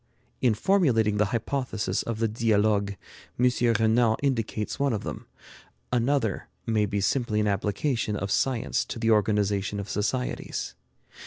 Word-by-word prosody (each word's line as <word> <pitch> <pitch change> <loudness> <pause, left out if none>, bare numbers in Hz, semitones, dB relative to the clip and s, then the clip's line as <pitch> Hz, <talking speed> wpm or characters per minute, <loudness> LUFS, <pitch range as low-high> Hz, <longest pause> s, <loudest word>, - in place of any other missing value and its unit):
In 120 -4 +3
formulating 115 - +2
the 105 - +3
hypothesis 115 +1 -2
of 115 -2 -4
the 115 0 +1
'Dialogues,' 105 -2 +1 0.4
M. 125 0 +4 0.3
Renan 110 0 +3
indicates 115 -5 -1
one 140 -3 +2
of 105 - -3
them. - - -6 0.7
Another 120 -3 0 0.2
may 110 -2 +1
be 100 +1 -1
simply 110 +1 +1
an 105 - +1
application 105 +3 0
of 100 -1 -3
science 125 -1 +1
to - - -6
the 115 0 +1
organization 105 -1 +1
of 100 - -5
societies. 125 +6 -2
110 Hz, 140 wpm, -26 LUFS, 105-125 Hz, 0.7 s, M